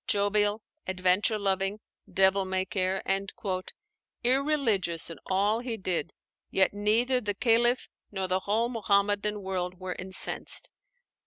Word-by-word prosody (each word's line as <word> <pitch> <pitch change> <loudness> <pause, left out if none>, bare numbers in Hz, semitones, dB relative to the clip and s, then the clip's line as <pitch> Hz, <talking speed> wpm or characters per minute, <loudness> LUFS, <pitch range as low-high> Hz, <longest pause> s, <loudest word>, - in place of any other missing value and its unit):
"Jovial, 205 +1 +2 0.2
adventure 185 +3 +2
loving, 195 0 0 0.3
devil 190 +1 +4
may 190 0 -1
care," 185 +1 0 1.2
irreligious 240 - +1
in 165 - -9
all 200 +4 +2
he 240 -2 -4
did, 185 -6 -2 0.4
yet 190 0 +3
neither 230 +5 +2
the 205 -3 -2
Khalif 240 +3 +2 0.2
nor 190 -2 -2
the 185 +1 +1
whole 215 +5 0
Muhammadan 205 -2 +1
world 185 -1 -3
were 185 -1 -4
incensed. 185 +1 -2
200 Hz, 115 wpm, -28 LUFS, 190-220 Hz, 1.2 s, devil